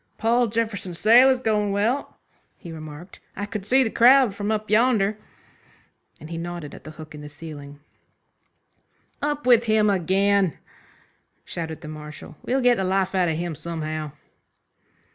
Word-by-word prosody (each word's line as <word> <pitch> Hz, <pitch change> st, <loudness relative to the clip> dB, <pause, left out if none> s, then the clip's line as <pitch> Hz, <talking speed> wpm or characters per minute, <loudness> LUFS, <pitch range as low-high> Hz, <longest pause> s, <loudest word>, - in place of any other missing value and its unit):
"Paul 235 Hz, +2 st, +2 dB
Jefferson's 210 Hz, -5 st, -3 dB
sale 240 Hz, +7 st, +6 dB
is 260 Hz, -1 st, +1 dB
goin' 210 Hz, -3 st, +1 dB
well," 220 Hz, +8 st, -1 dB, 0.4 s
he 170 Hz, -, -10 dB
remarked, 155 Hz, +2 st, -10 dB, 0.2 s
"I 200 Hz, -, -4 dB
could 205 Hz, -1 st, -6 dB
see 265 Hz, +4 st, +4 dB
the 225 Hz, -, -2 dB
crowd 250 Hz, -2 st, +5 dB
from 205 Hz, +1 st, -4 dB
up 215 Hz, -1 st, -1 dB
yonder," 215 Hz, -2 st, +2 dB, 1.0 s
and 155 Hz, -, -11 dB
he 165 Hz, -, -4 dB
nodded 170 Hz, -3 st, -6 dB
at -, -, -13 dB
the -, -, -8 dB
hook 155 Hz, -1 st, -10 dB
in 150 Hz, -, -9 dB
the 150 Hz, -, -9 dB
ceiling. 145 Hz, -2 st, -10 dB, 1.4 s
"Up 295 Hz, -1 st, -2 dB
with 240 Hz, -2 st, +5 dB
him 215 Hz, -2 st, +3 dB
again!" 195 Hz, -1 st, +1 dB, 0.9 s
shouted 160 Hz, -2 st, -6 dB
the 155 Hz, -, -9 dB
Marshal, 150 Hz, 0 st, -10 dB
"we'll 265 Hz, +2 st, 0 dB
get 245 Hz, -1 st, +4 dB
the 190 Hz, -, -1 dB
life 190 Hz, 0 st, 0 dB
out 185 Hz, -2 st, +2 dB
of 160 Hz, -, -1 dB
him 170 Hz, 0 st, -3 dB
somehow." 155 Hz, -1 st, -5 dB
195 Hz, 160 wpm, -24 LUFS, 160-225 Hz, 1.4 s, sale